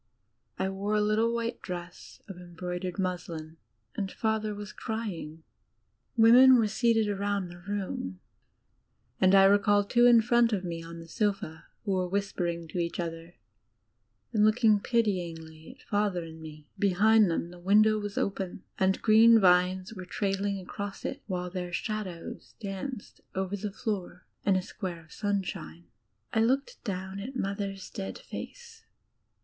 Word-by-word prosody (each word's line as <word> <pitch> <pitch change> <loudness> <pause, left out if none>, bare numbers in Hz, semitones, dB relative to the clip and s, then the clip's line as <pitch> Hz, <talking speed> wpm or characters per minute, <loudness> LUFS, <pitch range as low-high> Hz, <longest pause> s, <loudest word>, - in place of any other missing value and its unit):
I 190 - 0
wore 200 +2 -2
a - - +3
litde 215 +2 +2
white 235 0 -3
dress 175 -1 -8
of 195 - -8
embroidered 180 +1 -5
muslin, 170 -4 -4 0.4
and 195 -2 -3
Father 220 -1 -1
was 205 -1 -8
crying. 175 -8 -5 0.7
Women 245 +3 +8
were 225 -2 +3
seated 225 0 +2
around 200 -2 -1
the 175 0 -11
room, 185 - -4 1.0
and 185 +1 +5
I 195 - +8
recall 205 +1 +5
two 240 +4 +4
in 235 -2 +7
front 235 0 +3
of 195 -3 -1
me 170 -2 -4
on 165 0 -9
the 165 0 -10
sofa 195 -4 -2 0.2
who 200 - -1
were 185 -1 0
whisperitig 175 -4 -2
to 180 - -3
each 170 +1 -2
other 165 0 -5 1.0
and 210 -2 +3
looking 215 -1 +4
pityingly 170 -9 -2
at - - -22
Father 205 -4 0
and 160 0 -10
me. 155 -1 -11
Behind 205 +2 +4
them 170 +1 -2
the 180 - -12
window 215 +4 +4
was 205 -1 -5
open, 190 -2 -2 0.2
and 190 0 +2
green 225 +1 +7
vines 185 +1 +3
were 185 -4 -8
trailing 195 +1 -1
across 200 +2 -6
it, 275 - -4
while 180 -2 -3
their 180 -1 -4
shadows 185 -2 -5
danced 205 +4 -6
over 190 +1 -1
the 205 +1 -4
floor 195 -5 -4 0.2
in 195 - +5
a 185 - 0
square 180 -4 -6
of 155 - -24
sunshine. 190 -5 -3 0.5
I 220 - +3
looked 275 - 0
down 190 -2 -4
at 250 +7 -7
Mother's 195 -3 -3
dead 195 -2 -5
face. 470 -2 -9
195 Hz, 155 wpm, -29 LUFS, 180-215 Hz, 1.0 s, Women